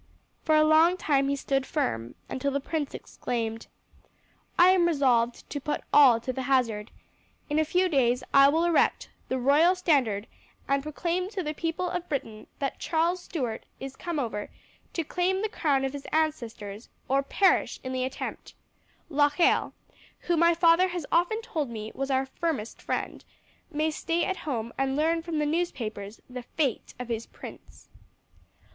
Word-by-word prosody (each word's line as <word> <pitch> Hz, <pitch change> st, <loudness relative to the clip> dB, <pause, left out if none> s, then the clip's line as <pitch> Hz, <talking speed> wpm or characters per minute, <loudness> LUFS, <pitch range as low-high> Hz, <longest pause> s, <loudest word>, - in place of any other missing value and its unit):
For 315 Hz, -, +2 dB
a 310 Hz, -, +6 dB
long 320 Hz, +3 st, +5 dB
time 275 Hz, -5 st, +2 dB
he 280 Hz, -, +1 dB
stood 270 Hz, -1 st, 0 dB
firm, 185 Hz, -, -2 dB
until 265 Hz, +2 st, -2 dB
the 280 Hz, 0 st, -1 dB
prince 290 Hz, 0 st, -3 dB
exclaimed: 225 Hz, -2 st, -4 dB, 0.9 s
"I 350 Hz, +1 st, +7 dB
am 365 Hz, -2 st, +4 dB
resolved 250 Hz, -7 st, +1 dB
to 285 Hz, -, -3 dB
put 300 Hz, -, -2 dB
all 260 Hz, -6 st, +7 dB
to 255 Hz, +2 st, -3 dB
the 265 Hz, -, -3 dB
hazard. 245 Hz, -6 st, +1 dB, 0.6 s
In 300 Hz, -, +2 dB
a -, -, +4 dB
few 360 Hz, +4 st, +2 dB
days 250 Hz, -6 st, +2 dB
I 275 Hz, 0 st, +8 dB
will 320 Hz, +3 st, +2 dB
erect 345 Hz, -2 st, +2 dB, 0.2 s
the 260 Hz, -, 0 dB
royal 295 Hz, +8 st, +4 dB
standard 270 Hz, -, +1 dB, 0.4 s
and 275 Hz, 0 st, +2 dB
proclaim 340 Hz, +5 st, -2 dB
to 400 Hz, -4 st, -4 dB
the 305 Hz, -1 st, -3 dB
people 330 Hz, +3 st, -2 dB
of 355 Hz, 0 st, -4 dB
Britain 225 Hz, -7 st, -4 dB
that 275 Hz, -2 st, -3 dB
Charles 340 Hz, +2 st, 0 dB
Stuart 250 Hz, -12 st, -4 dB
is 270 Hz, 0 st, -7 dB
come 345 Hz, -3 st, -4 dB
over 225 Hz, -6 st, -3 dB, 0.4 s
to 330 Hz, -, -1 dB
claim 365 Hz, +5 st, 0 dB
the -, -, +2 dB
crown 280 Hz, -9 st, +1 dB
of 270 Hz, -, -3 dB
his 285 Hz, -1 st, -7 dB
ancestors 235 Hz, -9 st, -2 dB, 0.2 s
or 270 Hz, +1 st, +2 dB
perish 380 Hz, +8 st, +2 dB
in 260 Hz, 0 st, -4 dB
the 255 Hz, 0 st, -1 dB
attempt. 260 Hz, -, -6 dB, 0.5 s
Locheil, 295 Hz, +2 st, +3 dB, 0.5 s
who 345 Hz, -, 0 dB
my 335 Hz, +1 st, +4 dB
father 340 Hz, +2 st, +5 dB
has 350 Hz, -4 st, -4 dB
often 360 Hz, +7 st, +2 dB
told 320 Hz, -, -3 dB
me 220 Hz, -2 st, -6 dB
was 275 Hz, 0 st, -3 dB
our 265 Hz, 0 st, +1 dB
firmest 265 Hz, -5 st, -3 dB
friend, -, -, -3 dB, 0.5 s
may 310 Hz, 0 st, 0 dB
stay 330 Hz, +2 st, -1 dB
at 380 Hz, -, -2 dB
home 235 Hz, -6 st, -4 dB
and 270 Hz, 0 st, +1 dB
learn 325 Hz, +3 st, +1 dB
from 330 Hz, -1 st, -4 dB
the 300 Hz, -, +1 dB
newspapers 230 Hz, -, -3 dB
the 250 Hz, 0 st, -7 dB
fate 265 Hz, 0 st, -2 dB
of 250 Hz, -, -5 dB
his 230 Hz, -1 st, -3 dB
prince." -, -, -12 dB
290 Hz, 170 wpm, -27 LUFS, 255-335 Hz, 0.9 s, I